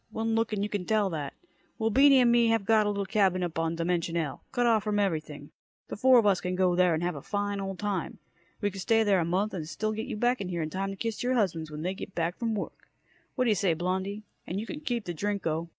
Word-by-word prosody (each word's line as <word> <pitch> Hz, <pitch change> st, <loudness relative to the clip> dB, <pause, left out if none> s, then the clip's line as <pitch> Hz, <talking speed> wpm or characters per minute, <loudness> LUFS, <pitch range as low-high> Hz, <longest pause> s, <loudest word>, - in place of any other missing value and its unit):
One 225 Hz, 0 st, -2 dB
look 225 Hz, 0 st, +1 dB
and 205 Hz, -2 st, -1 dB
you -, -, 0 dB
can 205 Hz, -3 st, -3 dB
tell 210 Hz, -2 st, +1 dB
that. 145 Hz, -4 st, -4 dB, 0.4 s
Well, 225 Hz, -1 st, 0 dB
Beany 270 Hz, +2 st, +6 dB
and 240 Hz, -1 st, +4 dB
me 235 Hz, -1 st, +4 dB
have 225 Hz, -3 st, +1 dB
got 215 Hz, -1 st, +4 dB
a -, -, +2 dB
little 200 Hz, -1 st, -2 dB
cabin 190 Hz, -3 st, +2 dB
up 165 Hz, -2 st, -3 dB
on 165 Hz, 0 st, 0 dB
Dimension 170 Hz, 0 st, -1 dB
L, 155 Hz, -5 st, -3 dB
cut 245 Hz, -, +1 dB
off 225 Hz, -3 st, +3 dB
from 210 Hz, -1 st, -1 dB
everything. 155 Hz, -7 st, -2 dB, 0.4 s
The -, -, -4 dB
four 255 Hz, +4 st, +5 dB
of 230 Hz, -, +4 dB
us 195 Hz, -3 st, +3 dB
can 180 Hz, 0 st, -2 dB
go 185 Hz, -1 st, +2 dB
there 180 Hz, -2 st, +4 dB
and 160 Hz, -, -2 dB
have 175 Hz, 0 st, 0 dB
a 140 Hz, -, -7 dB
fine 205 Hz, +2 st, -2 dB
old 195 Hz, -1 st, -4 dB
time. 200 Hz, -4 st, -3 dB, 0.4 s
We 205 Hz, -, 0 dB
could 195 Hz, 0 st, -7 dB
stay 225 Hz, +4 st, +3 dB
there 200 Hz, -3 st, +3 dB
a 165 Hz, -, 0 dB
month, 190 Hz, +5 st, 0 dB
and 160 Hz, -4 st, -5 dB
still 215 Hz, +4 st, -2 dB
get 220 Hz, +1 st, -4 dB
you -, -, -4 dB
back 245 Hz, +3 st, +1 dB
here 175 Hz, -3 st, -2 dB
in 155 Hz, -, -5 dB
time 195 Hz, +1 st, -2 dB
to 195 Hz, -, -5 dB
kiss 225 Hz, +1 st, -3 dB
your 255 Hz, +1 st, +1 dB
husbands 165 Hz, -8 st, 0 dB
when 150 Hz, +1 st, -6 dB
they 185 Hz, +2 st, -1 dB
get 195 Hz, 0 st, -8 dB
in 165 Hz, 0 st, +1 dB
from 225 Hz, +3 st, -3 dB
work. 200 Hz, -, -6 dB, 0.5 s
Whaddya 245 Hz, -4 st, +3 dB
say, 185 Hz, -4 st, +1 dB
Blondie? 190 Hz, +5 st, -2 dB, 0.2 s
And 185 Hz, -, -3 dB
you 215 Hz, -, -4 dB
can 300 Hz, +5 st, -6 dB
keep 240 Hz, -7 st, -3 dB
the 175 Hz, -, -3 dB
Drinko!" 170 Hz, -3 st, -2 dB
195 Hz, 265 wpm, -28 LUFS, 175-220 Hz, 0.5 s, Beany